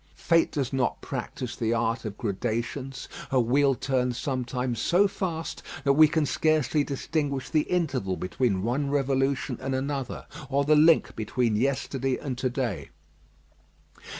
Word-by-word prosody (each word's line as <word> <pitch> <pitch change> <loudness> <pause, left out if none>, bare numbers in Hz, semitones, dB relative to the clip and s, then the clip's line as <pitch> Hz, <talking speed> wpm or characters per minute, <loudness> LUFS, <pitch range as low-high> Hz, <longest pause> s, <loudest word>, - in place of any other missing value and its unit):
Fate 165 -1 +2
does 135 -4 -2
not 130 -2 0
practise 125 -2 -5
the 115 -1 0
art 115 +1 -1
of 105 -2 -5
gradations. 120 +5 -3 0.2
Her 130 - +3
wheel 135 +3 +3
turns 125 -2 0
sometimes 125 -3 -2
so 190 +4 +4
fast 170 -4 -4 0.2
that 140 -1 +4
we 155 +2 +7
can 155 0 +1
scarcely 155 0 +2
distinguish 140 -1 -2
the 155 -1 +1
interval 135 - 0
between 95 +2 0
one 135 +5 0
revolution 135 -1 0
and 135 0 -2
another, 135 -1 -3 0.2
or 140 0 +1
the 155 +1 +5
link 155 +2 +5
between 115 +1 0
yesterday 135 +2 0
and 135 -4 -4
to 130 - +1
day. 120 -6 -3
135 Hz, 145 wpm, -27 LUFS, 120-145 Hz, 0.2 s, we